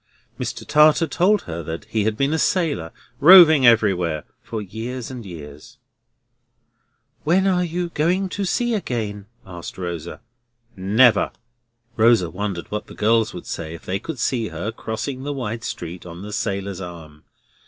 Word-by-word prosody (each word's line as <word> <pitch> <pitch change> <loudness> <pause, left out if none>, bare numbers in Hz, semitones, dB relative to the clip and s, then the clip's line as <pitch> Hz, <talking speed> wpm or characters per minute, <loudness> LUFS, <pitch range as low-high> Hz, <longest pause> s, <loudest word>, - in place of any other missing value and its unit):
Mr. - - -4
Tartar 155 +2 +5
told 180 +6 +2
her 80 -1 -5
he 110 -2 -1
had 110 -1 0
been 140 +4 +1
a 160 - 0
sailor, 150 - 0 0.3
roving 160 -4 +9
everywhere 90 -9 +3 0.2
for 115 - -5
years 115 +5 -6
and 125 -2 -7
years. 75 -4 -11 1.5
"When 180 +5 +3
are 180 -2 +2
you 175 +1 -3
going 175 +5 0
to 200 - -3
sea 240 +5 0
again?" 110 - -3 0.2
asked 90 -2 -9
Rosa. 85 -1 -5 0.5
"Never!" 105 +4 +4 0.7
Rosa 110 -6 +4
wondered 95 -1 -4
what 105 0 -4
the - - -12
girls 110 +1 +2
would 90 - -8
say 80 0 -5
if 85 - -13
they 95 +1 -2
could 160 +7 -6
see 120 -1 0
her 85 +6 -4
crossing 110 +5 -5
the 145 +2 -3
wide 115 -4 -4
street 85 -3 -6
on 85 +1 -9
the 105 0 -7
sailor's 100 -4 -3
arm. 80 -4 -10
110 Hz, 155 wpm, -22 LUFS, 90-145 Hz, 1.5 s, roving